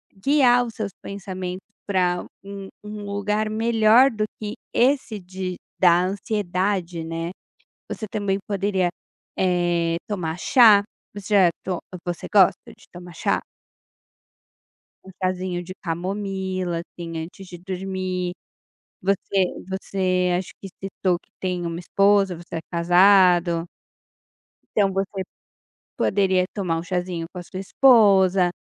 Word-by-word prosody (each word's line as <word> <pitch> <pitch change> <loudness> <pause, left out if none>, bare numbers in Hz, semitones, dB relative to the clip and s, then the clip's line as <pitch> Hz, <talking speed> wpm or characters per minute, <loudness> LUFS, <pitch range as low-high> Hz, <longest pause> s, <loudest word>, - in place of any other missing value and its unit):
guiar 245 +2 +4
os 230 - -7
seus 210 -3 -3
pensamentos 185 -2 -6 0.2
pra 180 -3 +1 0.2
um 195 -1 -8
um 210 0 -7
lugar 210 +1 -1
melhor 225 +3 +5
do 215 -2 -2 0.2
que 210 0 -4 0.2
esse 250 -4 +2
de 185 0 -5 0.2
da 175 -1 +5
ansiedade, 185 -3 -1
né. 165 +1 -4 0.6
Você 215 - -4
também 200 -1 -1
poderia, 195 -3 0 0.5
eh, 175 -2 +1
tomar 180 -6 -3
chá, 215 -1 +6 0.3
você 205 +1 -5
já 190 -4 +6
to 185 -2 -2 0.3
você 175 -2 -4
gosta 195 -4 +4
de - - -19
tomar 175 0 -11
chá? - - 0 1.6
Um 190 - -12
chazinho 185 -1 -2
de 185 +2 -8
camomila, 185 0 -3
assim, 170 -1 -8
antes 165 +4 -8
de 175 - -9
dormir, 185 0 -3 0.7
você 195 0 +1 0.2
você 185 -1 0
acho 180 0 -5
que 195 - -7 0.2
citou 185 -2 0
que - - -29
tem 180 -2 -2
uma 170 0 -3
esposa, 195 +1 +3
você 170 0 -9
é - - -1
casado 175 -1 +4 1.1
então, 200 -2 +4
você 195 0 -2 0.7
poderia 190 -2 +2
tomar 180 -5 -1
um - - -4
chazinho 180 -2 -3
com 180 - -8
a - - -5
sua 185 +2 -7
esposa 195 -5 +5
190 Hz, 125 wpm, -23 LUFS, 175-200 Hz, 1.6 s, chá